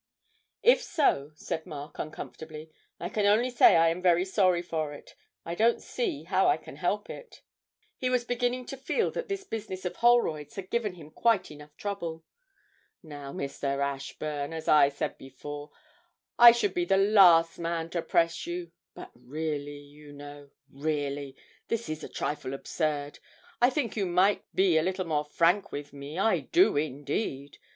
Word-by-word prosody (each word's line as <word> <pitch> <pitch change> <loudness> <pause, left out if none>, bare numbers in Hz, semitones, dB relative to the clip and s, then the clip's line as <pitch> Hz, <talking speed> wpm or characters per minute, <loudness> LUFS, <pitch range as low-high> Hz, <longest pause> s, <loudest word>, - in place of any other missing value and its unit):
'If 485 - +6
so,' 150 - +1
said 160 +1 -5
Mark, 145 0 -8
uncomfortably, 155 0 -8 0.3
'I 175 - -4
can 205 0 +1
only 230 +5 +3
say 240 -6 +6
I 165 0 +5
am 170 +2 -3
very 180 0 +3
sorry 185 -3 +2
for 155 -4 -3
it 145 - -13 0.3
I 170 - -4
don't 225 +6 +3
see 385 -12 -3
how - - +2
I - - +4
can - - -12
help - - -1
it.' - - -11 0.5
He 255 - -1
was 250 -1 +1
beginning 245 +1 -1
to 270 - -7
feel 270 - 0
that - - -4
this 395 -1 -3
business 205 - -6
of 180 - -4
Holroyd's 235 -12 +2
had 195 -1 -7
given 215 -6 -1
him 155 -3 -13
quite 225 +2 +2 0.3
trouble 200 -5 -4
enough. 165 - -21 0.8
'Now, 145 -3 -8
Mr. 140 0 -3
Ashburn, 140 +2 -3
as 160 -1 -6
I 145 -2 +6
said 140 - -4
before, 145 +3 -8 0.7
I 240 0 +11
should 220 -5 0
be 175 - 0
the 195 +2 +3
last 185 -5 +6
man 165 -1 -3
to 170 - -1
press 165 0 +1
you 175 -1 -5 0.2
but - - -10
really, 145 +3 -5
you 145 +1 -14
know, 145 0 -11 0.2
really 140 -1 -3 0.3
this 230 -3 -2
is 155 0 -5
a - - -7
trifle 135 -2 -3
absurd! 145 0 -3 0.4
I 245 - +6
think 265 -6 -2
you 200 -4 0
might 185 +4 +3
be 185 -4 +4
a - - +1
little 185 +2 -2
more 150 -2 -1
frank 175 +6 +2
with 145 0 -7
me, 140 +3 -8
I 220 +4 +2
do 360 +3 +3
indeed. 145 - -3
165 Hz, 170 wpm, -28 LUFS, 145-205 Hz, 0.8 s, I